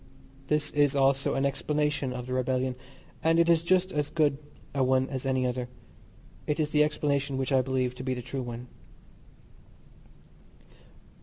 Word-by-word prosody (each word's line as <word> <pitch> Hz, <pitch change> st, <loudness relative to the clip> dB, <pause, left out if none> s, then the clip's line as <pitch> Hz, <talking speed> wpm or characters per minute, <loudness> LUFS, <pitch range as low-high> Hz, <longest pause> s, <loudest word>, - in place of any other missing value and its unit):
This 150 Hz, 0 st, 0 dB
is 145 Hz, -2 st, +2 dB
also 135 Hz, 0 st, +2 dB
an 135 Hz, -, +1 dB
explanation 145 Hz, 0 st, 0 dB
of 125 Hz, -1 st, -5 dB
the 125 Hz, -, -4 dB
rebellion, 130 Hz, 0 st, 0 dB, 0.5 s
and 165 Hz, +1 st, +3 dB
is 170 Hz, -1 st, +4 dB
just 185 Hz, +2 st, +2 dB
as 150 Hz, -1 st, -1 dB
good 145 Hz, -3 st, +1 dB, 0.3 s
a 135 Hz, -2 st, +1 dB
one 130 Hz, 0 st, +2 dB
as 135 Hz, 0 st, -3 dB
any 130 Hz, -1 st, +1 dB
other. 125 Hz, 0 st, -2 dB, 0.8 s
It 150 Hz, +1 st, 0 dB
is 150 Hz, -1 st, 0 dB
the 150 Hz, 0 st, +5 dB
explanation 140 Hz, -2 st, 0 dB
which 135 Hz, +1 st, -2 dB
I 135 Hz, -1 st, +4 dB
believe 130 Hz, -1 st, -1 dB
to 125 Hz, +1 st, -8 dB
be 130 Hz, 0 st, -1 dB
the 125 Hz, -, -6 dB
true 130 Hz, +2 st, -4 dB
one. 120 Hz, 0 st, -6 dB
135 Hz, 160 wpm, -28 LUFS, 130-150 Hz, 0.8 s, the